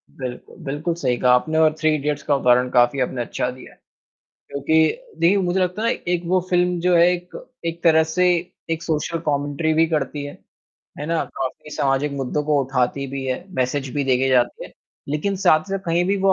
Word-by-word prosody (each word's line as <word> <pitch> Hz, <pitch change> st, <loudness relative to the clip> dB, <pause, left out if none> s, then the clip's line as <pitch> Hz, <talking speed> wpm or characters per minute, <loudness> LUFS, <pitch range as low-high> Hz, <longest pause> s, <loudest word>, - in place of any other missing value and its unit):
बिल्कुल, 125 Hz, -2 st, -8 dB
बिल्कुल 150 Hz, +5 st, -2 dB
सही 130 Hz, -7 st, 0 dB
कहा 125 Hz, +1 st, +3 dB
आपने 155 Hz, +6 st, +1 dB
और 155 Hz, -1 st, +4 dB
थ्री 155 Hz, 0 st, +2 dB
इडियट्स 150 Hz, 0 st, -2 dB
का 145 Hz, -, +2 dB
उदाहरण 125 Hz, -1 st, +3 dB
काफ़ी 120 Hz, +2 st, +3 dB
आपने 125 Hz, 0 st, -1 dB
अच्छा 120 Hz, +1 st, -2 dB
दिया 130 Hz, +1 st, -13 dB
है -, -, -27 dB, 0.7 s
क्योंकि 140 Hz, +3 st, -2 dB, 0.5 s
देखिए 175 Hz, +4 st, +4 dB
मुझे 185 Hz, 0 st, 0 dB
लगता 180 Hz, +3 st, -1 dB
है 230 Hz, -, +2 dB
ना, -, -, +2 dB
एक 175 Hz, -1 st, 0 dB
वो 185 Hz, +2 st, +2 dB
फ़िल्म 180 Hz, 0 st, +2 dB
जो 180 Hz, +1 st, +2 dB
है 170 Hz, 0 st, +6 dB
एक 180 Hz, 0 st, -6 dB, 0.3 s
एक 165 Hz, 0 st, -4 dB
तरह 160 Hz, -1 st, +6 dB
से 180 Hz, 0 st, +3 dB, 0.4 s
एक 165 Hz, 0 st, -2 dB
सोशल 165 Hz, +1 st, -2 dB
कॉमेंट्री 145 Hz, +2 st, 0 dB
भी 165 Hz, +1 st, +4 dB
करती 150 Hz, -2 st, -2 dB
है, 145 Hz, -, -7 dB, 0.7 s
है 150 Hz, -, -4 dB
ना? 165 Hz, 0 st, 0 dB
काफ़ी 135 Hz, +3 st, -5 dB
समाजिक 140 Hz, +1 st, +1 dB
मुद्दों 140 Hz, +2 st, -2 dB
को 150 Hz, -1 st, +2 dB
उठाती 135 Hz, +1 st, -1 dB
भी 135 Hz, 0 st, -5 dB
है, 130 Hz, +6 st, -3 dB
मैसेज़ 130 Hz, 0 st, -1 dB
भी 145 Hz, -, 0 dB
देके 130 Hz, 0 st, +2 dB
जाती 125 Hz, -2 st, +1 dB
है, -, -, -12 dB, 0.4 s
लेकिन 155 Hz, +8 st, -1 dB
साथ-साथ 190 Hz, +1 st, +2 dB
कहीं 170 Hz, +1 st, +2 dB
भी 200 Hz, +2 st, +1 dB
वो 190 Hz, -, +6 dB
150 Hz, 200 wpm, -21 LUFS, 135-170 Hz, 0.7 s, है